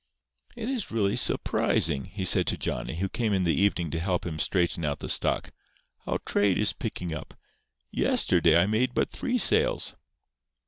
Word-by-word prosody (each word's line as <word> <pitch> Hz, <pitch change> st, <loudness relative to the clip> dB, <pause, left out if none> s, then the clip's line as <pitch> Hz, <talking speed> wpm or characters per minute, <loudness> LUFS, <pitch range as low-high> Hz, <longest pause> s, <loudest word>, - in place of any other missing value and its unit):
"It 235 Hz, -1 st, -5 dB
is 255 Hz, -6 st, -3 dB
really 105 Hz, -3 st, 0 dB
surprising," 75 Hz, -5 st, +1 dB
he 95 Hz, 0 st, -6 dB
said -, -, +5 dB
to -, -, 0 dB
Johnny, -, -, -4 dB
who 95 Hz, +4 st, -2 dB
came 110 Hz, +1 st, -1 dB
up -, -, +3 dB
in 95 Hz, -, 0 dB
the 85 Hz, -2 st, +2 dB
evening 90 Hz, -2 st, 0 dB
to 80 Hz, -, -2 dB
help 90 Hz, +1 st, -1 dB
him 80 Hz, -3 st, -5 dB
straighten 85 Hz, -2 st, 0 dB
out 75 Hz, -2 st, -1 dB
the -, -, -7 dB
stock, -, -, -1 dB, 0.6 s
"how -, -, 0 dB
trade 100 Hz, -2 st, +1 dB
is 105 Hz, -, +2 dB
picking 90 Hz, -7 st, -5 dB
up. 75 Hz, -, -8 dB, 0.6 s
Yesterday 85 Hz, 0 st, +3 dB
I 85 Hz, -, +3 dB
made 120 Hz, +5 st, 0 dB
but -, -, 0 dB
three 250 Hz, -1 st, -2 dB
sales." 475 Hz, -, +2 dB
95 Hz, 180 wpm, -27 LUFS, 85-115 Hz, 0.6 s, said